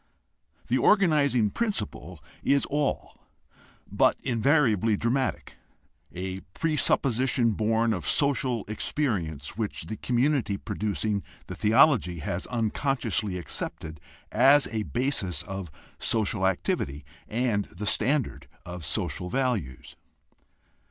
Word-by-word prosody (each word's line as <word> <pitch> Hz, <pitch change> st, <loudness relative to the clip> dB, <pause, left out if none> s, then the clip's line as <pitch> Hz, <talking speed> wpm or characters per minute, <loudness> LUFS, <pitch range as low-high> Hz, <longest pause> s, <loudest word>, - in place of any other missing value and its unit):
The -, -, +1 dB
organizing 145 Hz, -, +3 dB
principle 90 Hz, -, -3 dB, 0.2 s
is 140 Hz, 0 st, +2 dB
all 145 Hz, -1 st, -3 dB, 0.6 s
but -, -, +2 dB
invariably 115 Hz, -, +2 dB
dramatic, 130 Hz, +4 st, -1 dB, 0.5 s
a 95 Hz, +1 st, -5 dB, 0.2 s
presupposition 130 Hz, -6 st, +2 dB
born 110 Hz, +2 st, +1 dB
of -, -, -4 dB
social 135 Hz, -5 st, +2 dB
experience 100 Hz, -, -2 dB
which 110 Hz, -3 st, -2 dB
the 110 Hz, -, -6 dB
community 125 Hz, -4 st, +1 dB
producing 105 Hz, 0 st, -2 dB, 0.2 s
the -, -, -7 dB
theology 110 Hz, -, +4 dB
has 85 Hz, +3 st, -4 dB
unconsciously 115 Hz, -3 st, -1 dB
accepted 80 Hz, -3 st, -6 dB, 0.3 s
as 135 Hz, +5 st, +5 dB
a 110 Hz, -1 st, -1 dB
basis 120 Hz, -8 st, -1 dB
of 95 Hz, -3 st, -6 dB, 0.3 s
social 105 Hz, -3 st, +1 dB
activity 75 Hz, -6 st, -2 dB, 0.2 s
and 110 Hz, -3 st, 0 dB
the 100 Hz, +5 st, -8 dB
standard 130 Hz, +5 st, 0 dB, 0.2 s
of 90 Hz, -1 st, -7 dB
social 90 Hz, +4 st, -2 dB
values. 105 Hz, -, -2 dB
110 Hz, 100 wpm, -27 LUFS, 95-135 Hz, 0.6 s, as